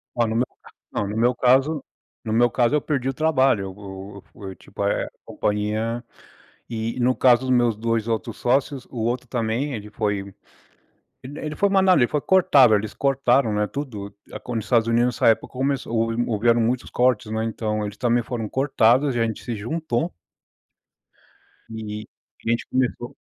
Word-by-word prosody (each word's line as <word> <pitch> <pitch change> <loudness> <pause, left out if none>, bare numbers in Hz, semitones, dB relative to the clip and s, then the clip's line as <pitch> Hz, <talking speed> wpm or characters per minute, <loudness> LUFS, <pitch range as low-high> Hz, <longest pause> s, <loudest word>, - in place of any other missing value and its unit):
Olha, 120 -2 +1
no 110 - -2
meu 125 - +2 0.5
não, 100 - -2
no 105 +2 -4
meu 120 +2 +3
caso 135 +4 +3 0.4
no 110 - -2
meu 120 +2 +4
caso 120 +2 +2
eu 150 - +2
perdi 135 -4 -2
o - - -2
trabalho, 135 -7 +2
e - - -3
eu 95 0 -8
eu 100 - -10
fui, 95 -2 -8
tipo - - -7
eh, 100 - 0
a - - -9 0.2
companhia 110 +3 -2 0.7
e 115 +1 -3
no 125 +1 +2
caso 125 -1 +5
dos 130 - -4
meus 120 -3 +3
2 115 +1 -1
outros 115 0 -2
sócios, 135 +1 0
o 125 - -10
outro 125 +1 -2
também, 120 +4 -1
ele 105 -2 -6
foi 105 -2 -1 1.0
ele 140 +3 -8
ele 155 -1 -5
foi 200 - +2
mandado 190 -3 +4
ele 120 - +4
foi 150 - -1
cortado, 145 - +5
eles 105 +1 -2
cortaram, 135 -4 +2
né, 105 0 +1
tudo. 110 -8 -6 0.2
A - - -6
quando 120 -2 -4
os 110 - -7
Estados 115 0 +2
Unidos, 120 0 +2
nessa - - +2
época, 110 - +2
começou 130 -2 -1
houve 115 +1 +1
houveram 115 +1 +2
muitos 120 +2 -1
cortes, 120 -3 +1
né. 110 0 -1
Então, 110 -1 -2
eles 105 0 -7
também 120 -1 +1
foram 115 -3 -4
cortados, 130 0 +2
e - - 0
a - - +3
gente 110 -1 -5
se 120 - -4
juntou 155 +6 -2 1.6
e 105 -1 -6 0.4
a - - +1
gente 115 0 0
começou 125 -1 -1
120 Hz, 190 wpm, -23 LUFS, 110-130 Hz, 1.6 s, caso